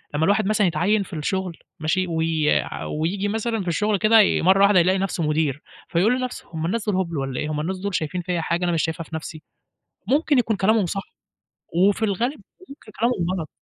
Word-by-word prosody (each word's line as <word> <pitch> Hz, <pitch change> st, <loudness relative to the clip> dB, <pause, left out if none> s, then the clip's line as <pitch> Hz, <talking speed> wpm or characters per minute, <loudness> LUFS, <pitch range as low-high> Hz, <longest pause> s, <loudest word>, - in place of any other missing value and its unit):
لمّا 155 Hz, +2 st, +2 dB
الواحد 205 Hz, +3 st, +2 dB
مثلًا 210 Hz, -2 st, +2 dB
يتعيّن 190 Hz, +6 st, +1 dB
في 195 Hz, -, -13 dB
الشغل، 180 Hz, +2 st, -3 dB, 0.2 s
ماشي؟ 160 Hz, +4 st, 0 dB
وي 160 Hz, -2 st, 0 dB
ع -, -, -7 dB
وييجي 180 Hz, +6 st, -2 dB
مثلًا 225 Hz, 0 st, -1 dB
في 180 Hz, -, -7 dB
الشغل 210 Hz, +4 st, +1 dB
كده 220 Hz, +3 st, +5 dB
ي 205 Hz, -, +2 dB
مَرّة 190 Hz, +3 st, +4 dB
واحدة 200 Hz, -2 st, +6 dB
يلاقي 185 Hz, +2 st, +3 dB
نَفْسه 190 Hz, -3 st, -2 dB
مدير، 150 Hz, -2 st, 0 dB, 0.3 s
فيقول 215 Hz, +9 st, +2 dB
لنَفْسه 255 Hz, -1 st, -5 dB
هُم 160 Hz, 0 st, -3 dB
الناس 210 Hz, +6 st, -2 dB
دول 205 Hz, -, +1 dB
هُبل 170 Hz, -4 st, -2 dB
والّا 135 Hz, -2 st, -3 dB
إيه؟َ 150 Hz, -, -2 dB
هُم 150 Hz, -, -2 dB
الناس 185 Hz, +5 st, -3 dB
دول 200 Hz, 0 st, -3 dB
شايفين 165 Hz, +3 st, -2 dB
فيَّ 175 Hz, -1 st, -2 dB
حاجة 170 Hz, +2 st, -1 dB
أنا 175 Hz, -, +1 dB
مش 165 Hz, -2 st, +1 dB
شايفها 165 Hz, +1 st, -3 dB
في 160 Hz, -, -9 dB
نَفْسي؟ 155 Hz, 0 st, -7 dB, 0.6 s
ممكن 290 Hz, 0 st, +2 dB
يكون 225 Hz, -3 st, +1 dB
كلامهم 210 Hz, +1 st, +2 dB
صح، 195 Hz, +3 st, -3 dB, 0.7 s
وفي 200 Hz, +5 st, +3 dB
الغالب 230 Hz, +7 st, -1 dB, 0.3 s
ممكن 275 Hz, -7 st, -13 dB
كلامهم 230 Hz, -7 st, +1 dB
غلط. 160 Hz, -, -5 dB
185 Hz, 210 wpm, -23 LUFS, 160-210 Hz, 0.7 s, واحدة